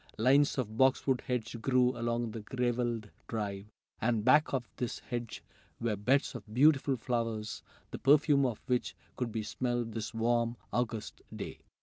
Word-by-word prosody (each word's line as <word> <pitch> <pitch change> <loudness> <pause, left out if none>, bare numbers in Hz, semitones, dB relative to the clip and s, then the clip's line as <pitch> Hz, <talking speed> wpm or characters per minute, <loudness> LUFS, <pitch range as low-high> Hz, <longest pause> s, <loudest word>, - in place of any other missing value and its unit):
Lines 140 +6 +4
of 110 -4 -3
boxwood 130 0 +3
hedge 115 -2 -2
grew 125 0 +3
along 120 0 -1
the 115 - -6
graveled 120 -1 -1 0.2
drive, 100 -3 -3 0.3
and 110 -1 +1
back 150 +4 +5
of 125 -4 -1
this 120 -2 -2
hedge 120 -3 -5 0.4
were 115 -2 0
beds 125 +8 +1
of 105 -4 -9
beautiful 135 +1 +4
flowers, 115 -2 -2 0.3
the - - -5
perfume 145 0 +5
of 115 -4 -4
which 125 -1 0 0.2
could 125 -2 -2
be 110 0 -2
smelled 120 +1 -2
this 110 0 -4
warm, 115 0 +1 0.2
August 115 -3 -2
day. - - -6
120 Hz, 150 wpm, -32 LUFS, 115-130 Hz, 0.4 s, back